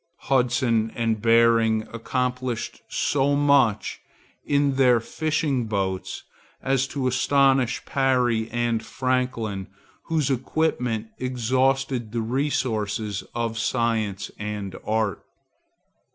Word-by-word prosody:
Hudson 120 -4 +1
and 115 -2 0
Behring 115 -1 +4
accomplished 125 +1 -3
so 140 0 +1
much 140 -7 +2 0.4
in 140 -1 +1
their 125 -3 +5
fishing 145 -1 -1
boats 95 -3 -2 0.4
as 135 0 +1
to 140 -2 -3
astonish 130 -1 +2
Parry 125 -4 +1
and 120 -2 -1
Franklin, 115 -5 -2 0.4
whose 155 -4 0
equipment 125 -4 -1
exhausted 130 -1 0
the 115 - 0
resources 110 -5 -1
of 115 -1 -2
science 110 -4 -1
and 105 -2 -4
art. 110 -2 -1
120 Hz, 95 wpm, -24 LUFS, 110-135 Hz, 0.4 s, their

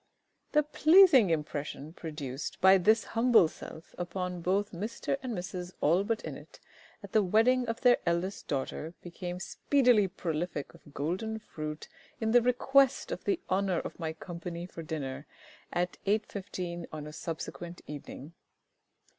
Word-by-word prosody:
_ - - -39
The 300 0 +5
pleasing 310 - +6
impression 150 -1 -3
produced 150 -5 -6
by 190 0 +7
this 220 +4 +4
humble 230 -6 +4
self 160 +1 -11
upon 180 0 -3
both 195 +4 0
Mister 215 +9 -2
and 245 -5 -4
Mrs 180 0 -5
ALLBUTT 200 +8 +2
INNETT - - -9 0.4
at - - -9
the 215 - +4
wedding 225 +6 +3
of 230 0 -3
their 245 -2 +6
eldest 175 +3 -1
daughter 150 +4 -3
became 175 0 -6
speedily 245 -1 +3
prolific 170 -3 -3
of 145 - -17
golden 190 +9 -2
fruit 155 -7 -7 0.3
in 220 -1 0
the 245 +1 +6
request 265 +2 +3
of - - -5
the 380 -3 +1
honour 190 -1 +1
of - - -5
my 160 -2 -2
company 170 +1 -6
for 175 -2 -9
dinner 145 -4 -5 0.4
at 180 0 -1
8.15 205 -1 -1
P.M. 175 -2 -4
on 155 -1 -6
a 150 - -8
subsequent 170 +2 -6
evening. 150 +1 -8
180 Hz, 145 wpm, -30 LUFS, 165-220 Hz, 0.4 s, by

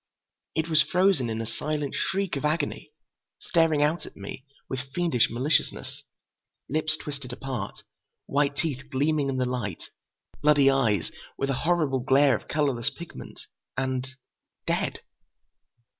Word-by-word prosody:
It 160 0 +1
was 155 -2 +6
frozen 180 -9 +3
in 110 0 -2
a - - -3
silent 145 +5 -2
shriek 195 -3 0
of 140 - -3
agony, 155 +3 -1 0.5
staring 165 -3 +3
out 155 +3 +1
at - - -10
me 100 +7 -7 0.2
with 135 +1 -5
fiendish 170 -9 +3
maliciousness. 135 +6 0 0.7
Lips 155 +2 0
twisted 140 -5 -6
apart. 125 -5 -5 0.4
White 140 0 +1
teeth 140 -6 -2
gleaming 145 +1 +1
in 130 - -1
the 130 - +2
light. 120 -8 -4 0.5
Bloody 145 -2 +6
eyes, 115 -9 +2 0.3
with 135 0 0
a 130 - -2
horrible 155 -7 +2
glare 135 +2 +5
of - - -7
colorless 135 -5 +1
pigment. 170 +2 -10 0.4
And—dead. 130 0 -3
140 Hz, 130 wpm, -27 LUFS, 130-155 Hz, 0.7 s, was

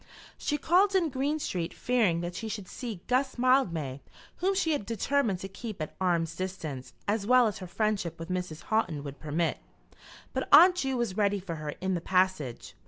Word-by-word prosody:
She 295 - -1
called 375 +6 +3
in 350 -4 +3
Green 280 +3 -1
Street 180 - -3
fearing 215 -9 +2
that 175 0 -4
she 225 - -5
should 205 -3 -5
see 225 -6 -6
Guss 260 +1 +1
Mildmay 170 - +2 0.4
whom 385 +2 +1
she 335 -4 +1
had 290 -8 0
determined 230 0 0
to 195 - -4
keep 210 +1 -7
at 155 - -5
arm's 165 -3 +1
distance 165 -8 -5
as 205 0 0
well 250 0 +6
as 210 -3 -1
her 185 - -7
friendship 195 -4 -1
with 165 +1 -8
Mrs. 180 -4 -3
Houghton 180 -10 0
would 140 -1 -8
permit; 160 +2 -1 0.7
but - - -2
Aunt 360 +1 +9
Ju 270 -5 0
was 235 -6 -2
ready 205 -1 +2
for 185 -2 -6
her 150 -1 -5
in 190 0 0
the 175 - -1
passage. 185 -9 0
195 Hz, 190 wpm, -29 LUFS, 170-255 Hz, 0.7 s, Aunt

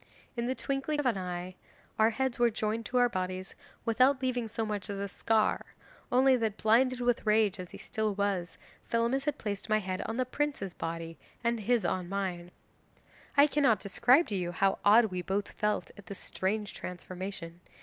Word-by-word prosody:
In 235 0 -2
the 260 - 0
twinkling 275 +3 -2
of 295 - -1
an 245 -4 +3
eye 180 0 -4 0.5
our 220 +1 +6
heads 260 +2 -1
were 240 -1 +5
joined 220 +1 -2
to 250 - -1
our 245 0 +5
bodies 185 -2 -4 0.3
without 255 +4 +4
leaving 250 -3 0
so 225 +1 -3
much 210 -1 -4
as 200 - -3
a 200 0 -2
scar; 220 +2 0 0.4
only 260 +1 +5
that, 220 -3 -1
blinded 250 +3 +3
with 245 -1 +1
rage 210 -3 +3
as 180 -1 -6
he - - -10
still 215 -3 -2
was, 195 -4 -1 0.3
Thelamis 235 +4 +1
had 295 -1 0
placed 205 0 -4
my 215 - +4
head 185 -3 -3
on 225 - -3
the 255 - +1
prince's 255 -8 -2
body, 165 0 -5 0.2
and 235 0 +1
his 235 +2 +1
on 180 -2 -1
mine! 185 -3 -3 0.9
'I 285 - +9
cannot 280 -8 +3
describe 250 - +4
to 205 - -1
you 175 -2 -1
how 195 +3 +2
odd 220 +3 +7
we 180 0 -2
both 200 +3 -2
felt 210 0 -1
at 205 -3 -14
this 200 - -7
strange 205 +2 -2
transformation. 180 -1 -7
215 Hz, 190 wpm, -30 LUFS, 190-245 Hz, 0.9 s, I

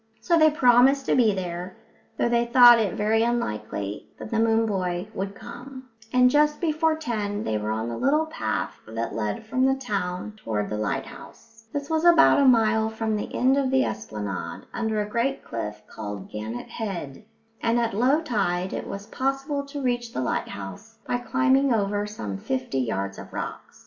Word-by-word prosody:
So 240 +10 +2
they 315 -1 +6
promised 265 -1 +4
to - - +2
be 235 -4 +4
there, 180 -1 -5 0.4
though - - +2
they 235 0 +2
thought 240 -1 +8
it 210 -4 0
very 215 +2 +2
likely 105 - -3
that - - -9
the 225 - +1
moon 225 0 +3
boy 185 -3 -2
wouldn't 195 +1 -4
come; 255 +2 -10 0.2
and 250 0 +5
just 300 +3 +3
before 320 -1 +1
ten 215 -9 -3
they 110 -1 -1
were 105 0 -3
on 110 +1 -2
the 115 -1 -4
little 300 +4 +2
path 315 - -3
that 115 +1 -4
led 105 - -3
from 255 +4 0
the 265 0 +4
town 205 -6 -3
toward 105 - -3
the 105 - -2
lighthouse. 225 - -6
This 285 -1 -3
was 320 0 0
about 345 -4 +6
a 280 - +4
mile 220 -3 +4
from 220 -1 -2
the 210 - -4
end 260 +2 +3
of 275 -2 +1
the 265 0 +3
esplanade, 105 -3 -5
under 220 -2 -1
a - - -7
great 240 +6 -1
cliff 105 -2 -5
called 105 -3 -7
Gannet 110 +3 -6
Head, 190 - -5 0.4
and 235 +1 +2
at 230 -1 0
low 260 +9 +3
tide 190 - -1
it - - -4
was 200 +1 -6
possible 275 +4 -2
to 280 0 -6
reach 240 -2 -1
the - - -2
lighthouse 130 - -5
by 245 - -1
climbing 265 +2 +2
over 205 -2 0
some 105 - -5
fifty 130 +4 -2
yards 100 -5 -2
of - - -10
rocks. - - -6
225 Hz, 185 wpm, -25 LUFS, 175-260 Hz, 0.4 s, thought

